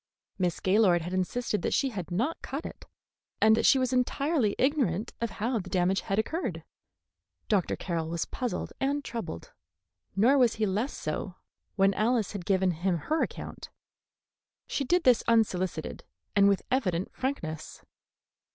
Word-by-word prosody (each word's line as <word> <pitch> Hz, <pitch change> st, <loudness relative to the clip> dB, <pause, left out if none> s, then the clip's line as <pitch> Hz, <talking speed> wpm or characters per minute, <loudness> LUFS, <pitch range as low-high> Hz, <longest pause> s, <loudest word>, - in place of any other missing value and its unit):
Miss 180 Hz, -3 st, 0 dB
Gaylord 185 Hz, -3 st, +3 dB
had 175 Hz, +2 st, -5 dB
insisted 210 Hz, +4 st, -1 dB
that -, -, 0 dB
she 270 Hz, -, +2 dB
had 190 Hz, -8 st, -6 dB
not 235 Hz, -, -1 dB
cut 280 Hz, +5 st, -5 dB
it, -, -, -9 dB, 0.5 s
and 220 Hz, 0 st, +6 dB
that 230 Hz, -, +2 dB
she 275 Hz, -, +6 dB
was 255 Hz, -1 st, 0 dB
entirely 255 Hz, -2 st, +1 dB
ignorant 250 Hz, -, +1 dB
of 235 Hz, -, 0 dB
how 230 Hz, +2 st, 0 dB
the 185 Hz, -1 st, -7 dB
damage 185 Hz, +1 st, +1 dB
had 195 Hz, -, -2 dB
occurred. 220 Hz, -, -2 dB, 0.9 s
Dr. 195 Hz, -4 st, +2 dB
Carroll 165 Hz, -3 st, -3 dB
was 170 Hz, 0 st, -2 dB
puzzled 250 Hz, -3 st, -4 dB
and 280 Hz, +1 st, 0 dB
troubled, 205 Hz, -, -6 dB, 0.6 s
nor 245 Hz, +8 st, +5 dB
was 245 Hz, -3 st, +4 dB
he 220 Hz, -, +1 dB
less 210 Hz, +7 st, -1 dB
so 175 Hz, +4 st, -4 dB, 0.4 s
when 195 Hz, 0 st, +4 dB
Alice 225 Hz, -1 st, +1 dB
had 200 Hz, -5 st, -6 dB
given 190 Hz, -2 st, +2 dB
him 175 Hz, +2 st, 0 dB
her 310 Hz, -, -1 dB
account. -, -, -5 dB, 1.0 s
She 280 Hz, -, -2 dB
did 350 Hz, +6 st, +2 dB
this 250 Hz, -3 st, +5 dB
unsolicited, 185 Hz, -8 st, 0 dB, 0.3 s
and 200 Hz, -1 st, +6 dB
with 200 Hz, -, +1 dB
evident 190 Hz, -9 st, 0 dB
frankness. 175 Hz, -, -4 dB
210 Hz, 155 wpm, -29 LUFS, 180-255 Hz, 1.0 s, and